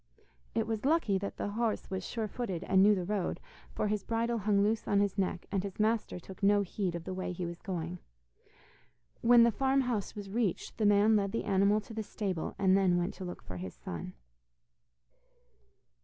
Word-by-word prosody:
It - - +1
was 220 -1 -3
lucky 275 -10 +2
that 200 - -5
the - - -2
horse 220 0 -2
was 190 -1 -2
sure 225 +1 -3
footed 195 -6 -4
and 190 - +4
knew 205 +1 +6
the 180 -2 -2
road, 200 -1 -1 0.4
for - - 0
his 210 -1 -1
bridle 230 0 0
hung 200 -1 +2
loose 215 +1 0
on 200 - +3
his 200 -1 +1
neck, 185 -3 -1
and 195 -2 +1
his 195 0 -7
master 215 -3 +1
took 185 +2 -12
no 205 0 +4
heed 185 -2 -2
of 170 - -5
the 185 - -5
way 185 0 -3
he 180 0 -4
was 170 0 -7
going. 175 -3 -4 1.2
When 240 0 +7
the 235 - +5
farm 270 +3 +2
house 240 -6 -2
was 200 -2 -7
reached, 225 0 -1
the 215 - +4
man 205 +2 +5
led 200 -1 +1
the 230 - -1
animal 200 +1 +3
to 215 - -11
the 220 - -3
stable, 195 -5 -3
and 190 -1 +4
then 190 -3 +3
went 175 +2 -1
to 190 - -7
look 180 - -7
for 90 - -7
his 90 0 -6
son. 85 +1 -6
200 Hz, 205 wpm, -31 LUFS, 185-220 Hz, 1.2 s, When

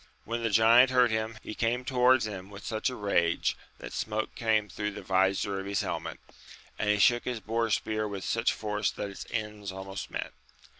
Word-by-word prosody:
When 115 +1 -3
the 115 - 0
giant 115 +4 +6
heard 125 -2 +4
him, 110 0 -2
he - - -6
came 120 +3 -1
towards 125 -2 +4
him 95 -3 -6
with 100 -1 -11
such 110 +3 -1
rage 100 -8 +1 0.2
that - - -9
smoke 110 0 -2
came 110 -2 +1
through 105 +2 -4
the - - -8
vizor 95 +1 +1
of 95 - -6
his 100 0 0
helmet, - - -4 0.6
and 105 - 0
he 105 - +4
shook 120 +4 +4
his 125 -2 -2
boar 115 +1 -1
spear 110 0 0
with 100 -2 -5
such 115 +1 +1
force 105 -1 -1
that 100 - -5
its 100 - -9
ends 105 -3 -4
almost 95 +1 -6
met. - - -4
110 Hz, 195 wpm, -29 LUFS, 100-115 Hz, 0.6 s, giant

